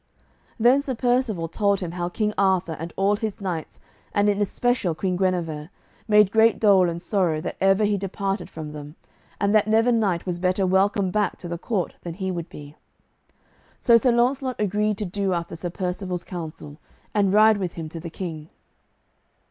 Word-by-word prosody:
Then 245 +5 +5
Sir 270 -3 -3
Percivale 245 -8 0
told 200 +3 +1
him 175 -3 -4
how 175 0 -3
King 210 +3 -1
Arthur 185 -4 +1
and 165 +2 -6
all 200 +1 +2
his 220 -1 -4
knights, 180 -5 -5 0.4
and 205 0 +3
in 205 0 +1
especial 205 -4 0
Queen 185 +3 -1
Guenever, 175 -5 -1 0.4
made 210 -2 +5
great 225 +1 +4
dole 195 -4 +5
and 170 0 -4
sorrow 175 -5 0
that - - -5
ever 195 +2 +4
he 205 -1 +1
departed 195 0 -3
from 155 -2 -7
them, 150 0 -9 0.4
and 200 0 +1
that 215 -1 +4
never 225 +3 +3
knight 200 -7 +1
was 175 -2 -3
better 185 +1 +1
welcome 190 +1 +2
back 210 +1 0
to 175 - -8
the 170 0 -5
court 195 -3 -2
than 170 -2 -6
he 190 0 -3
would 170 -2 -5
be. 145 0 -11 1.0
So 235 - +5
Sir 245 +2 +4
Launcelot 255 +2 +1
agreed 210 0 0
to 210 - -3
do 195 +1 -1
after 170 -1 -3
Sir 175 +2 -4
Percivale's 180 0 -4
counsel, 160 -4 -8 0.3
and 200 -3 +2
ride 215 +1 +6
with 185 -3 -3
him 165 -2 -6
to 165 - -7
the 170 +1 -7
King. 160 -3 -7
195 Hz, 185 wpm, -24 LUFS, 175-210 Hz, 1.0 s, ride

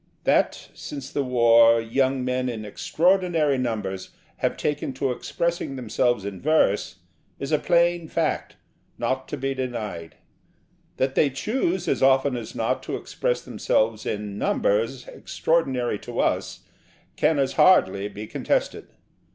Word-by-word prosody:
That, - - +1
since 140 -2 -8
the 140 - -1
War, 115 -2 +5
young 130 +3 0
men 125 0 -1
in 110 -3 -5
extraordinary 165 - +1
numbers 105 -6 -3 0.3
have - - -1
taken 150 -2 -2
to 135 0 -1
expressing 170 +3 -2
themselves 120 -3 0
in 100 -2 -6
verse 145 -13 +2 0.4
is 140 - -5
a 150 - +3
plain 170 -1 +2
fact, - - -2 0.4
not 130 0 -2
to 150 - -5
be 135 0 -2
denied: 110 -11 -5 0.8
that 130 0 0
they 145 - +3
choose, 185 - -1
as - - 0
often 135 0 +4
as 115 -3 -7
not, - - -1
to - - -4
express - - -2
themselves 110 0 0
in 105 -1 -4
'numbers' 115 +5 0
extraordinary 130 -9 -1
to 120 -1 -6
us - - -1 0.5
can 160 - +2
as 135 -1 +1
hardly 100 - +4
be 105 +1 -8
contested. - - -2
130 Hz, 135 wpm, -24 LUFS, 115-145 Hz, 0.8 s, War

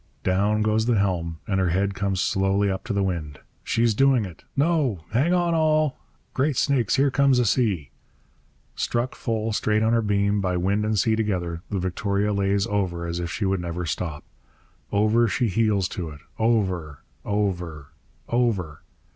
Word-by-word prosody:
Down 100 +3 +2
goes 110 +1 +1
the 120 -3 +3
helm, 85 -5 -1
and 95 -2 0
her 95 -2 +2
head 100 +3 0
comes 100 -1 -1
slowly 95 +1 +1
up 95 - -4
to 115 - -3
the 100 -1 +1
wind. 80 -7 -3 0.3
'She's 115 -1 +2
doing 130 -1 +3
it 85 -5 -11
No! 140 - +1
Hang 135 - +2
on, 175 -1 +2
all! 155 -3 +2 0.3
Great 140 0 0
snakes, 130 -7 +2
here 140 0 +3
comes 140 -1 +3
a 125 - +3
sea!' 95 - 0 0.8
Struck 120 +2 -1
full, 110 -1 -2
straight 110 +1 +1
on 110 +1 +2
her 115 - +3
beam, 100 -1 +1
by 90 -2 0
wind 100 +4 0
and 110 0 0
sea 110 +2 +2
together, 90 -6 -2
the 100 - -2
Victoria 100 +3 -1
lays 100 0 +1
over 95 -6 -2
as 85 0 -3
if 85 -1 -3
she 100 - -2
would 95 -1 0
never 85 0 -4
stop. 80 0 -4 0.7
Over 110 +3 +3
she 110 +3 0
heels 100 -2 +1
to 85 -4 -5
it 75 -1 -12 0.2
over, 95 -10 0 0.2
over, 90 -8 -2 0.4
over! 105 -11 0
100 Hz, 170 wpm, -24 LUFS, 90-115 Hz, 0.8 s, the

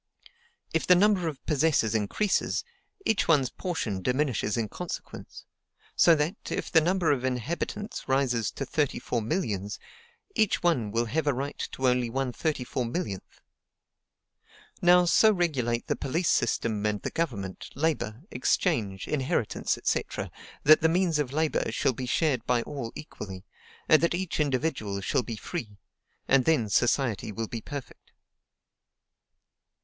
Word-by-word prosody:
If 165 - 0
the 180 - +8
number 190 -2 +3
of 145 -4 -6
possessors 150 -7 +2
increases, 110 - 0 0.4
each 220 -7 +2
one's 140 -6 +3
portion 120 - -3
diminishes 125 -2 0
in 115 -2 0
consequence; - - -7 0.5
so 170 - +6
that, 155 +6 -1
if - - -3
the 160 - +6
number 175 0 +2
of 130 -3 0
inhabitants 130 - -3
rises 130 -4 +1
to - - -4
thirty 150 -3 0
four 120 - -2
millions, 105 - -2 0.6
each 215 - +1
one 135 -12 +2
will 115 +3 0
have 150 +6 -1
a 140 - +3
right 140 +3 -4
only 125 -2 +2
to - - -10
1/34,000,000. 130 - -2 1.6
Now, 180 0 +6
so 215 +5 +5
regulate 135 - 0
the - - 0
police 160 +6 -1
system 110 -2 +1
and 105 -1 -1
the - - -3
government, 100 - -3
labor, 140 -5 -1
exchange, 105 -5 0
inheritance, 130 -6 0
&c., - - +2 0.6
that 155 +2 +7
the 160 - +4
means 170 -2 +2
of 140 -4 -1
labor 155 +2 0
shall 130 - +1
be 125 +2 -5
shared 130 -3 +1
by 120 -1 +2
all 135 -6 -5
equally, 95 -11 -8 0.4
and 155 - +6
that 170 +1 +2
each 185 -2 -3
individual 130 -8 0
shall 95 - +1
be 115 -1 -5
free; 110 - -6 0.5
and 135 -2 +4
then 145 -10 +2
society 120 -1 +1
will 115 +2 -3
be 115 0 -5
perfect. 140 +3 -9
135 Hz, 140 wpm, -28 LUFS, 115-160 Hz, 1.6 s, the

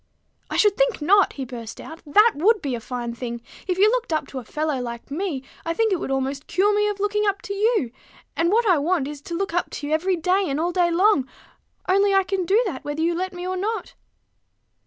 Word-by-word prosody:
"I - - -2
should 415 -2 +4
think - - +2
not," 390 +6 +4
he 270 - -5
burst 235 -3 -8
out. 320 +1 -10
"That 420 +10 +6
would 415 +9 +3
be 280 -7 -3
a 240 - -2
fine 240 0 -5
thing! 235 0 -5 0.3
If 365 -1 0
you 400 +2 +6
looked - - -1
up 310 - 0
to 265 - -5
a - - -9
fellow 300 +2 -2
like 235 +2 -7
me, 310 -4 -3 0.2
I 330 0 -2
think 445 0 +2
it 365 - 0
would - - -4
almost 270 +1 -2
cure 405 +4 +2
me 420 0 +2
of 410 -1 -4
looking 420 +1 0
up 400 0 +1
to 400 - -4
you; 415 - +1 0.4
and 335 +2 +1
what 460 +2 +3
I 355 -6 +4
want 310 -2 0
is 295 -1 -7
to 340 - -6
look 390 0 -2
up 350 - 0
to 290 - -6
you 295 - -1
every 365 +4 +1
day 365 +4 +1
and 280 0 -1
all 345 +2 0
day 350 -1 +2
long: 340 -6 +3 0.6
only 395 +1 +3
I 390 - +5
can 375 -1 -2
do 405 +4 +4
that 300 -11 -4
whether 290 +2 -3
you 340 +1 +2
let 370 +2 -2
me 355 -1 -7
or 370 - -2
not." 415 +1 -3
355 Hz, 245 wpm, -23 LUFS, 290-400 Hz, 0.6 s, That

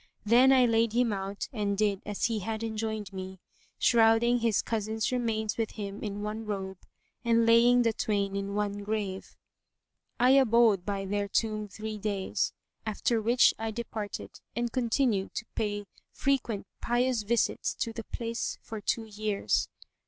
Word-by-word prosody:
Then 245 +5 +6
I 260 -2 +6
laid 225 -1 +2
him 240 -2 +2
out 195 0 -4
and 205 -3 -1
did 205 -2 +1
as 205 -1 -1
he 230 -2 0
had 220 +3 -4
enjoined 220 -3 -3
me, 190 0 -7 0.4
shrouding 235 +1 +4
his 230 -3 +1
cousin's 220 0 -1
remains 225 -3 -1
with 225 -2 -2
him 200 -1 -6
in 205 -1 -4
one 215 +1 -4
robe 190 -3 -4 0.4
and 230 -1 +3
laying 240 +2 +6
the 230 -1 +2
twain 200 -2 -1
in 200 0 -3
one 205 -1 -1
grave. 200 -2 -3 0.8
I 250 +2 +5
abode 230 -7 +4
by 200 -1 -2
their 205 +1 -1
tomb 215 0 -1
three 215 +1 -6
days, 200 -2 -1 0.3
after 220 +1 0
which 235 +3 +5
I 225 0 -2
departed 220 -2 -6 0.2
and 235 0 -1
continued 235 -5 0
to 220 - -3
pay 205 -1 -2 0.3
frequent 240 -7 -1 0.2
pious 240 -1 +1
visits[FN#140] 235 +3 0
to 230 - -2
the 230 - -6
place 230 -1 -3
for 220 -1 -7
two 225 +2 -1
years. 210 -1 -1
220 Hz, 155 wpm, -29 LUFS, 205-230 Hz, 0.8 s, Then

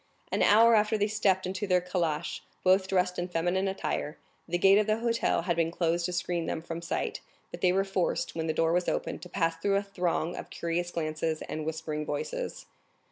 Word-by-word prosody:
An - - 0
hour 230 +3 +6
after 215 0 +3
they 205 - +2
stepped 200 -3 +1
into 190 +2 -3
their 180 -1 +4
calash, 175 -3 -2 0.2
both 190 +1 +4
dressed 180 -1 +1
in 175 - -2
feminine 175 +3 0
attire. 190 -5 -3 0.3
The 175 +1 0
gate 195 +3 +6
of 210 - +1
the 215 0 +2
hotel 230 -6 +1
had 175 -1 0
been 165 0 +1
closed 170 0 0
to - - -4
screen 175 -1 -2
them 160 - -3
from 170 0 -5
sight, 170 - -3 0.3
but - - -8
they 180 - +4
were 195 +1 +2
forced, 195 -2 -1
when 165 0 -3
the - - +2
door 165 +1 +2
was 180 0 +1
open, - - -2
to 180 - -10
pass 165 -1 0
through 200 +2 +1
a 200 - +1
throng 175 -4 -1
of - - -7
curious 170 +1 -2
glances 155 -1 -2
and 155 0 -5
whispering 155 -1 -3
voices. 485 - -4
180 Hz, 210 wpm, -29 LUFS, 165-195 Hz, 0.3 s, hour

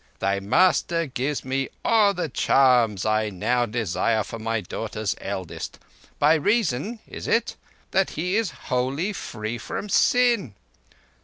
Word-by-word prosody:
Thy 100 0 0
master 165 - +2
gives 140 +1 -3
me 135 +1 -1 0.2
all 210 -3 +4
the 175 - -2
charms 125 -7 +3
I 110 0 +1
now 120 +6 0
desire 110 0 0
for 115 - -8
my 115 0 -1
daughter's 105 0 -4
eldest, 95 -3 -5 0.4
by 150 +2 +5
reason—is 205 - -1
it?—that 195 0 -1
he 180 +5 -2
is 225 -3 +1
wholly 140 +8 -2
free 110 - -5
from 210 - -5
sin. 235 - +3
130 Hz, 125 wpm, -24 LUFS, 110-180 Hz, 0.4 s, by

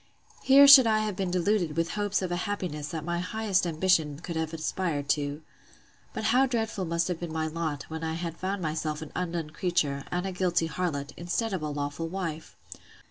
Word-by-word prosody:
—Here 275 +1 +7
should 270 -4 +10
I 215 -1 +3
have 210 -2 -2
been 190 -1 -2
deluded 180 -3 0
with 165 0 +1
the - - -5
hopes 205 -2 0
of 180 - -3
a - - 0
happiness 165 -7 -3
that 160 -2 -5
my 175 0 -1
highest 195 0 0
ambition 160 -3 +1
could 170 +1 -6
have 160 -1 -1
had 165 0 -7
aspired 155 -3 -2
to!—But 145 +7 -5
how 250 +5 +4
dreadful 225 -6 -2
must 170 0 0
have 180 -3 -3
been 170 -2 -5
my 160 0 -1
lot, 155 -3 -3
when 160 0 -7
I 160 0 -2
had 170 -1 -4
found 190 +1 -3
myself 155 0 -2
an 155 - -10
undone 170 -3 -3
creature, 155 -5 -1
and 180 +1 -2
a 190 - -2
guilty 180 -2 +1
harlot, 150 -3 -3
instead 195 +6 -2
of 185 - -2
a 155 - -2
lawful 145 +2 -3
wife! 165 -3 -5
170 Hz, 205 wpm, -28 LUFS, 155-190 Hz, -, should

